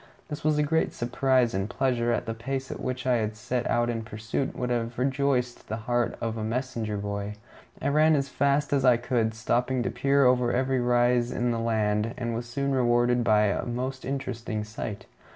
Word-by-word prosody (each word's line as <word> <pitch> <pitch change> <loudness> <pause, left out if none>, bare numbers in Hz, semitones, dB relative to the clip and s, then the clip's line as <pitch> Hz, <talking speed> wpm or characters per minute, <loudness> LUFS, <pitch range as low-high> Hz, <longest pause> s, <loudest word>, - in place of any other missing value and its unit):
This 150 0 -6
was 155 0 +2
a 150 - +3
great 160 +2 +1
surprise 125 0 +1
and 95 +2 -1
pleasure, 125 -3 0
and 120 - -1
the 115 - -3
pace 130 +3 -4
at - - -6
which 130 0 -3
I 120 -4 +2
set 120 +3 -3
out 120 0 +2
in 115 -1 -2
pursuit 110 +4 -3
would 125 0 -2
have 120 0 -2
rejoiced 130 -1 0
the 110 - -2
heart 120 -1 0
of 115 -1 -3
a 110 - -3
messenger 115 -2 -2
boy. 100 0 -4 0.4
I 130 - -2
ran 155 +2 +4
as 140 -1 0
fast 140 +1 +1
as 135 -2 +2
I 125 -3 +6
could, 115 -2 0
stopping 125 +3 0
to - - -1
peer 140 0 +3
over 125 -1 +3
every 130 +1 +1
rise 120 0 +2
in 120 0 0
the 115 - -1
land, 110 -1 0
and 120 -2 -2
was 120 +1 -4
soon 140 +3 -2
rewarded 120 -1 +3
by 105 -2 +4
a 100 -1 +1
most 130 +2 -4
interesting 120 -5 -3
sight. 105 -1 -6
120 Hz, 200 wpm, -27 LUFS, 115-130 Hz, 0.4 s, I